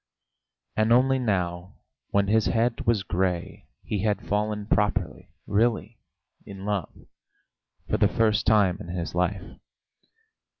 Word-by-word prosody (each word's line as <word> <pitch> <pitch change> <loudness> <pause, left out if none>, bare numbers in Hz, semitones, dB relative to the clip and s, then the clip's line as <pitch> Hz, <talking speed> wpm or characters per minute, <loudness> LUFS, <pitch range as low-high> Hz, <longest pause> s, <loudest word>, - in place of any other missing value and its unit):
And 110 +1 +2
only 130 +2 +4
now 90 -6 -2 0.3
when 100 0 +2
his 110 +1 +3
head 115 0 0
was 110 -5 +2
grey 90 -2 -2 0.2
he 105 - -3
had 105 0 -1
fallen 105 0 -1
properly, 105 -1 -1 0.2
really 110 +1 0 0.4
in 100 -1 -9
love 100 -5 -4 0.8
for - - 0
the - - +4
first 110 -2 +1
time 100 -4 +4
in 105 - -8
his 85 -1 -4
life. 90 +2 0
105 Hz, 125 wpm, -26 LUFS, 95-110 Hz, 0.8 s, only